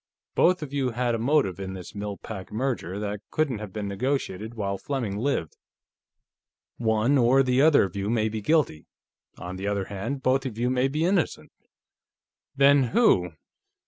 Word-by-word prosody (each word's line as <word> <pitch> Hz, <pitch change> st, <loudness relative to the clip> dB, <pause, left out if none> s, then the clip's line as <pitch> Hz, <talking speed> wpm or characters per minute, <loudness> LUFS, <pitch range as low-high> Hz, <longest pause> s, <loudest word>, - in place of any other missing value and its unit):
Both 180 Hz, -2 st, +3 dB
of 140 Hz, -2 st, -8 dB
you 135 Hz, -3 st, 0 dB
had 120 Hz, 0 st, -1 dB
a 115 Hz, -, -1 dB
motive 125 Hz, -, +1 dB
in 95 Hz, -1 st, -5 dB
this 90 Hz, -2 st, -9 dB
Mill 105 Hz, -1 st, -5 dB
Pack 95 Hz, -4 st, -8 dB
merger 110 Hz, -6 st, -2 dB
that 105 Hz, 0 st, -4 dB
couldn't 140 Hz, -8 st, 0 dB
have 105 Hz, -3 st, -7 dB
been 105 Hz, 0 st, -4 dB
negotiated 110 Hz, -1 st, -2 dB
while 100 Hz, -3 st, -2 dB
Fleming 125 Hz, -8 st, -3 dB
lived. 110 Hz, -, -1 dB, 1.2 s
One 115 Hz, +4 st, +2 dB
or 130 Hz, +3 st, +5 dB
the 130 Hz, 0 st, +2 dB
other 155 Hz, 0 st, +6 dB
of 95 Hz, -2 st, -4 dB
you 100 Hz, +1 st, -2 dB
may 110 Hz, -1 st, +1 dB
be 110 Hz, 0 st, -4 dB
guilty; 125 Hz, -, +1 dB, 0.5 s
on 90 Hz, +1 st, -7 dB
the 95 Hz, +2 st, -4 dB
other 100 Hz, -1 st, -1 dB
hand, 115 Hz, +8 st, -4 dB
both 130 Hz, +1 st, +2 dB
of 110 Hz, -4 st, -7 dB
you 125 Hz, +2 st, 0 dB
may 130 Hz, +1 st, +2 dB
be 150 Hz, +4 st, -1 dB
innocent." 180 Hz, -2 st, 0 dB, 1.0 s
"Then 140 Hz, -1 st, +5 dB
who...?" 90 Hz, -, +4 dB
115 Hz, 175 wpm, -26 LUFS, 100-135 Hz, 1.2 s, other